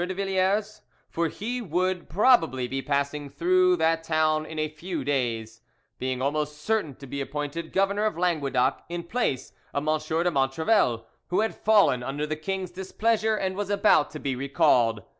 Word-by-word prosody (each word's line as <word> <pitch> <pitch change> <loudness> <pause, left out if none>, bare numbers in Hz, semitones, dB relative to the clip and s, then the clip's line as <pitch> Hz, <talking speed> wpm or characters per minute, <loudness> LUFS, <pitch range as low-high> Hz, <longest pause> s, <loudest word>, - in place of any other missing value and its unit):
de 185 +1 -3
Villars; 195 +2 0 0.3
for 170 0 0
he 235 +10 -4
would 185 -1 -1
probably 165 - +3
be 135 +2 -3
passing 140 +1 -2
through 180 +5 +3
that 165 0 +1
town 155 -1 +1
in 160 - -8
a 155 0 0
few 165 +4 -5
days, 115 -5 -2 0.4
being 130 0 -2
almost 150 +1 -1
certain 185 -6 -1
to 140 - -11
be 140 +1 -5
appointed 145 +4 -4
governor 200 +2 +1
of 210 -6 -1
Languedoc 150 -8 +1
in 170 0 -4
place 170 - -2 0.2
of 140 +2 -1
M. 155 0 +2 0.2
de 175 - +1
Montrevel, 135 - +1 0.2
who 185 +4 +1
had 220 - 0
fallen 205 - +3
under 140 +4 -3
the 155 0 -3
king's 185 +3 -4
displeasure 215 +4 0
and 190 -2 -2
was 205 0 -3
about 205 -7 +4
to 155 - -8
be 135 -3 -2
recalled. 120 -5 +2
160 Hz, 170 wpm, -26 LUFS, 140-190 Hz, 0.4 s, about